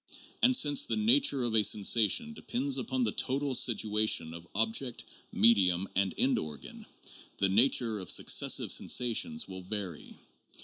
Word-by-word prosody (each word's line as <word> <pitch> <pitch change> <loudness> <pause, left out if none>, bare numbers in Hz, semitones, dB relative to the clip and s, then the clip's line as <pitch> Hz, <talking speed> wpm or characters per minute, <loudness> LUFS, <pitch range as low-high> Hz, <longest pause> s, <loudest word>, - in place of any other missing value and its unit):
And 255 +2 +3
since 280 +2 +3
the - - -3
nature 220 - +2
of 120 -2 -3
a 110 - +5
sensation 110 - +2
depends 260 +4 -3
upon 260 -1 -3
the - - -1
total 140 +1 -2
situation 110 -8 +1
of 85 +1 -12
object, 115 +4 -2 0.3
medium, 95 -4 +2
and 95 0 -2
end 135 - 0
organ, 75 -4 -10 0.5
the 95 - -1
nature 115 +1 +2
of 95 - -5
successive - - +2
sensations 220 - 0
will 95 0 -10
vary. 95 -3 -7
115 Hz, 140 wpm, -28 LUFS, -, 0.5 s, a